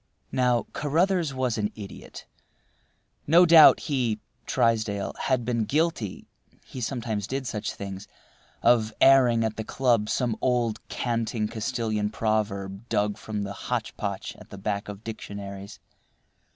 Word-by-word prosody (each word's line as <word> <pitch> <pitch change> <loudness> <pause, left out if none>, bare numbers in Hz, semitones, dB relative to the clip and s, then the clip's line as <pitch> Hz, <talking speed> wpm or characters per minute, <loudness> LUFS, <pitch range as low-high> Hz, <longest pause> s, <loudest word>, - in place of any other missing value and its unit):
Now, 125 -2 +2
Carruthers 165 +2 +1
was 130 -4 -1
an 105 0 -1
idiot. 100 -3 -10 1.0
No 170 +4 +7
doubt 165 -2 +8
he 125 -8 -1 0.3
(Trysdale) 110 -3 +1
had 130 -3 +1
been 115 -2 0
guilty 150 - -1 0.4
(he 130 - -8
sometimes 115 -5 -3
did 135 0 -3
such 105 -4 -3
things) 100 0 -7 0.6
of 115 -2 +4
airing 125 -4 +6
at 110 -1 -3
the 110 - -3
club 115 -3 +1
some 120 -4 0
old, 120 -3 +1
canting 115 -2 -1
Castilian 110 -1 -2
proverb 105 -1 -2
dug 105 0 +1
from 105 -2 -4
the 100 0 -5
hotchpotch 105 -4 -4
at - - -14
the 100 - -9
back 100 +1 -3
of 100 +1 -8
dictionaries. 100 -3 -7
115 Hz, 130 wpm, -26 LUFS, 105-125 Hz, 1.0 s, doubt